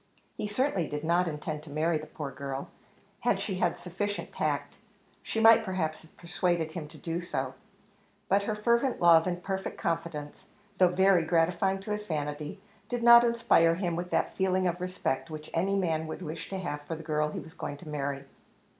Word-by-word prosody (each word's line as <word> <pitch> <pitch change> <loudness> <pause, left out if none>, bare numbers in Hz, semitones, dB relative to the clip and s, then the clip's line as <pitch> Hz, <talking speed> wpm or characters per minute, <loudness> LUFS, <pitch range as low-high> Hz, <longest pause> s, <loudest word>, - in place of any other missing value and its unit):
He - - -3
certainly 205 - 0
did 150 0 -4
not 175 +2 +2
intend 150 -1 -4
to 155 - -12
marry 155 +2 +1
the 155 - -9
poor 150 -2 -6
girl; 135 +1 -5 0.5
had 205 -5 +1
she 195 -2 -3
had 175 -2 +1
sufficient 205 +3 -4
tact, - - -1 0.5
she 225 - -3
might, 225 0 +7
perhaps, 180 -6 -2
have 160 - -20
persuaded 170 -2 -1
him 160 -2 -6
to - - -13
do 170 +1 -3
so; 175 - -3 0.7
but 200 - +3
her 210 +1 -2
fervent 235 +4 +1
love 170 0 +6
and 175 -1 -3
perfect 190 0 -3
confidence, 165 -3 -4 0.3
though 185 - +7
very 185 0 +4
gratifying 175 +4 +2
to 210 - -6
his 210 0 -3
vanity, 150 -1 -3 0.3
did 245 -1 -2
not 235 0 +9
inspire 230 -8 +4
him 175 -2 -1
with 175 +1 -4
that - - 0
feeling 185 -1 +1
of 175 0 -1
respect 180 -5 -2
which 155 -1 -8
any 190 +4 +1
man 160 -5 0
would 160 +3 -6
wish 160 0 -6
to 195 - -3
have 150 -6 -4
for 155 +3 -5
the 160 - -9
girl 150 -1 0
he - - -5
was 160 - -11
going 145 -4 -5
to 155 - -13
marry. 140 -2 -3
170 Hz, 195 wpm, -29 LUFS, 155-195 Hz, 0.7 s, not